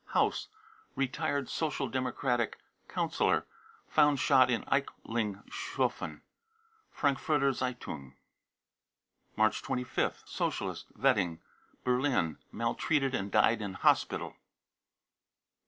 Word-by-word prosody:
haus, -, -, +2 dB, 0.5 s
retired 135 Hz, +1 st, -1 dB
Social 150 Hz, -4 st, -1 dB
Democratic 125 Hz, -2 st, 0 dB, 0.3 s
councillor, -, -, +1 dB, 0.4 s
found 145 Hz, -2 st, +4 dB
shot 130 Hz, -2 st, +5 dB
in 120 Hz, -3 st, +1 dB
Eichlingshofen. 120 Hz, -, -2 dB, 0.7 s
{Frankfurter 140 Hz, -1 st, +2 dB, 1.8 s
March 110 Hz, 0 st, +3 dB
25th. 125 Hz, 0 st, -2 dB
socialist, -, -, -2 dB
Wedding, 85 Hz, -2 st, +2 dB, 0.4 s
Berlin, 125 Hz, -, +1 dB
maltreated 135 Hz, -4 st, 0 dB
and 100 Hz, -4 st, -2 dB
died 115 Hz, +3 st, +4 dB
in 100 Hz, -3 st, -4 dB
hospital. -, -, +2 dB
130 Hz, 75 wpm, -31 LUFS, 115-140 Hz, 1.8 s, shot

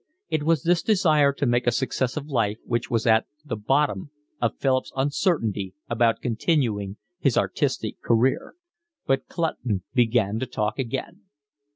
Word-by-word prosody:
It 155 Hz, -, 0 dB
was 160 Hz, -2 st, +2 dB
this 170 Hz, -1 st, +3 dB
desire 155 Hz, -8 st, +4 dB
to 140 Hz, +1 st, -1 dB
make 120 Hz, 0 st, +1 dB
a -, -, +5 dB
success 130 Hz, +2 st, -1 dB
of 145 Hz, -, -3 dB
life 115 Hz, -8 st, 0 dB
which 120 Hz, -1 st, -1 dB
was 115 Hz, -2 st, 0 dB
at 110 Hz, -1 st, +4 dB, 0.2 s
the 130 Hz, -6 st, -3 dB
bottom 135 Hz, +1 st, 0 dB, 0.3 s
of 115 Hz, -, 0 dB
Philip's 130 Hz, -1 st, +1 dB
uncertainty 125 Hz, -, 0 dB, 0.2 s
about 115 Hz, -1 st, +2 dB
continuing 115 Hz, -, 0 dB, 0.2 s
his -, -, +2 dB
artistic -, -, -1 dB
career. 120 Hz, +3 st, +1 dB, 0.5 s
But 135 Hz, 0 st, 0 dB
Clutton 125 Hz, -, -2 dB
began 115 Hz, -4 st, +2 dB
to 130 Hz, -, -3 dB
talk 110 Hz, 0 st, -2 dB
again. 135 Hz, -, -4 dB
125 Hz, 150 wpm, -25 LUFS, 110-145 Hz, 0.5 s, a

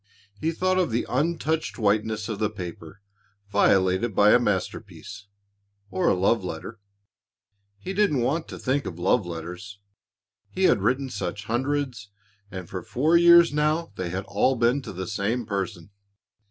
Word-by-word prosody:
He 155 Hz, +10 st, -2 dB
thought 185 Hz, +2 st, 0 dB
of 180 Hz, -, +1 dB
the 115 Hz, +1 st, -1 dB
untouched 160 Hz, +3 st, -1 dB
whiteness 110 Hz, 0 st, 0 dB
of 110 Hz, -3 st, -4 dB
the 105 Hz, -, +1 dB
paper 90 Hz, -3 st, -9 dB, 0.5 s
violated 95 Hz, +3 st, +2 dB
by 105 Hz, +1 st, +6 dB
a 120 Hz, -, +6 dB
masterpiece 105 Hz, -1 st, -4 dB, 0.6 s
or 180 Hz, -2 st, 0 dB
a -, -, +3 dB
love 100 Hz, +3 st, +2 dB
letter. 90 Hz, +5 st, -7 dB, 1.0 s
He 185 Hz, -, -6 dB
didn't 195 Hz, -10 st, +2 dB
want 150 Hz, +7 st, -1 dB
to -, -, -8 dB
think 140 Hz, +2 st, -1 dB
of 85 Hz, -, -6 dB
love 90 Hz, +3 st, +1 dB
letters. 90 Hz, +4 st, -7 dB, 0.7 s
He 190 Hz, -, -3 dB
had 105 Hz, -, +4 dB
written 130 Hz, +5 st, 0 dB
such 100 Hz, +3 st, -4 dB
hundreds, 125 Hz, -2 st, -2 dB, 0.4 s
and 95 Hz, -2 st, -7 dB
for 90 Hz, 0 st, -5 dB
four 130 Hz, +10 st, +1 dB
years 170 Hz, -1 st, +7 dB
now 155 Hz, 0 st, 0 dB
they 90 Hz, -3 st, -4 dB
had 95 Hz, +3 st, -4 dB
all 100 Hz, +7 st, +1 dB
been 120 Hz, +3 st, +2 dB
to 125 Hz, -, -8 dB
the 95 Hz, 0 st, -5 dB
same 110 Hz, +7 st, -2 dB
person. 100 Hz, -3 st, -4 dB
110 Hz, 155 wpm, -25 LUFS, 95-145 Hz, 1.0 s, years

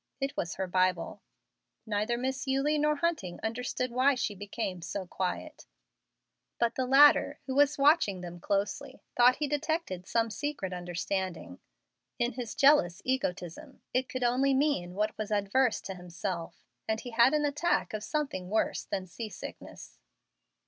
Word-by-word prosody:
It 275 Hz, 0 st, -2 dB
was 170 Hz, -, -3 dB
her 190 Hz, -, -2 dB
Bible. 185 Hz, -1 st, 0 dB, 0.6 s
Neither 215 Hz, +2 st, 0 dB
Miss 265 Hz, +2 st, -3 dB
Eulie 275 Hz, +3 st, +1 dB
nor 300 Hz, 0 st, +2 dB
Hunting 295 Hz, -, -2 dB
understood 250 Hz, +2 st, -2 dB
why 260 Hz, +3 st, +3 dB
she 235 Hz, -4 st, -1 dB
became 200 Hz, -2 st, -4 dB
so 190 Hz, +3 st, -4 dB
quiet; 180 Hz, 0 st, -4 dB, 0.9 s
but 235 Hz, 0 st, +1 dB
the 260 Hz, -1 st, -1 dB
latter, 280 Hz, +3 st, +6 dB
who 265 Hz, -, -3 dB
was 285 Hz, +1 st, +4 dB
watching 275 Hz, -, +4 dB
them 175 Hz, -1 st, -8 dB
closely, 200 Hz, +9 st, -2 dB
thought 250 Hz, +1 st, +6 dB
he 300 Hz, -, -1 dB
detected 295 Hz, -, -2 dB
some 230 Hz, -1 st, +1 dB
secret 280 Hz, -8 st, -3 dB
understanding. 180 Hz, +1 st, -4 dB, 0.6 s
In 240 Hz, 0 st, +1 dB
his 240 Hz, -2 st, -5 dB
jealous 275 Hz, -, +4 dB
egotism 255 Hz, -, -3 dB
it 255 Hz, +1 st, 0 dB
could 255 Hz, -1 st, -3 dB
only 260 Hz, +3 st, +3 dB
mean 260 Hz, -11 st, 0 dB
what 215 Hz, +1 st, 0 dB
was 215 Hz, 0 st, -3 dB
adverse 210 Hz, +4 st, +2 dB
to 195 Hz, -, -6 dB
himself, 175 Hz, -1 st, -6 dB, 0.2 s
and 220 Hz, 0 st, 0 dB
he 245 Hz, -, -8 dB
had 235 Hz, +5 st, +5 dB
an 300 Hz, -1 st, +2 dB
attack 295 Hz, +2 st, 0 dB
of 215 Hz, -1 st, -3 dB
something 270 Hz, -, -3 dB
worse 220 Hz, +2 st, 0 dB
than 190 Hz, -1 st, -3 dB
sea 215 Hz, +5 st, -7 dB
sickness. -, -, -10 dB
235 Hz, 155 wpm, -30 LUFS, 190-275 Hz, 0.9 s, latter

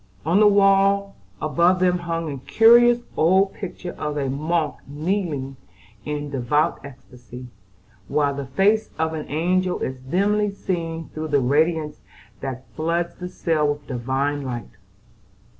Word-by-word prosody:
On 170 Hz, +5 st, +3 dB
the 215 Hz, -, +7 dB
wall 200 Hz, 0 st, +3 dB, 0.2 s
above 170 Hz, +4 st, +2 dB
them 180 Hz, -1 st, +2 dB
hung 165 Hz, -2 st, -3 dB
a 140 Hz, -, -5 dB
curious 240 Hz, -, +5 dB
old 190 Hz, +4 st, +3 dB
picture 180 Hz, -2 st, -7 dB
of 150 Hz, -1 st, -3 dB
a 135 Hz, -2 st, -1 dB
monk 155 Hz, +2 st, -1 dB
kneeling 145 Hz, -3 st, -3 dB, 0.5 s
in 150 Hz, -1 st, -3 dB
a -, -, -7 dB
devout 140 Hz, +3 st, 0 dB
ecstasy, 125 Hz, -2 st, -12 dB, 0.6 s
while 145 Hz, -1 st, +1 dB
the 140 Hz, -1 st, -5 dB
face 200 Hz, +10 st, +2 dB
of 160 Hz, 0 st, -1 dB
an 155 Hz, -1 st, -6 dB
angel 180 Hz, +4 st, 0 dB
is 130 Hz, 0 st, -4 dB
dimly 205 Hz, +9 st, +1 dB
seen 165 Hz, -4 st, -4 dB
through 155 Hz, 0 st, -5 dB
the 145 Hz, -2 st, +2 dB
radiance 150 Hz, +4 st, +1 dB, 0.4 s
that 130 Hz, -1 st, -6 dB
floods 170 Hz, +2 st, -1 dB
the 180 Hz, 0 st, -7 dB
cell 160 Hz, -4 st, 0 dB
with 145 Hz, 0 st, -3 dB
divine 135 Hz, +3 st, -2 dB
light. 120 Hz, -4 st, -6 dB
160 Hz, 140 wpm, -22 LUFS, 140-185 Hz, 0.6 s, the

